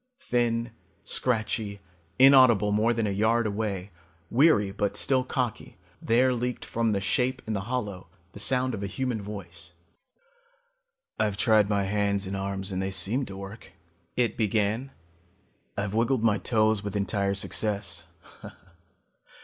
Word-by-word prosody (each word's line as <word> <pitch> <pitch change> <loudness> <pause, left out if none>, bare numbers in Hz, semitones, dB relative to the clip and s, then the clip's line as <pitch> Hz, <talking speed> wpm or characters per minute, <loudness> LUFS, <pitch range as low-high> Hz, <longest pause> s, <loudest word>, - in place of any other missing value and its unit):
Thin, 120 - 0 0.3
scratchy, 110 -4 -1 0.4
inaudible 130 -6 +6
more 110 +3 +2
than 115 -2 0
a 100 - 0
yard 110 +4 +2
away, 100 -2 -3 0.4
weary 120 -7 +4
but 100 0 -1
still 130 -2 +2
cocky, 125 -3 -3 0.2
there 125 +3 +3
leaked 125 0 -3
from 115 -1 0
the 100 - +1
shape 125 +6 0
in 110 - -3
the 100 -2 -3
hollow 105 -7 -3 0.3
the - - -9
sound 130 +3 +2
of 105 - -4
a 100 - -2
human 120 +1 -3
voice. 90 -4 -8 1.5
"I've 105 -2 0
tried 110 -2 +4
my 100 -1 +1
hands 100 0 0
and 95 +1 -4
arms 95 0 -4
and 95 0 -2
they 95 - -2
seem 100 +8 0
to 95 - -8
work," 100 -1 -10 0.4
it 120 -4 0
began. 110 +3 0 0.9
"I've 100 0 -2
wiggled 115 +2 +1
my 110 -3 +3
toes 110 -3 +2
with 100 -1 -5
entire 100 0 0
success. 100 -3 -2
105 Hz, 140 wpm, -27 LUFS, 100-120 Hz, 1.5 s, inaudible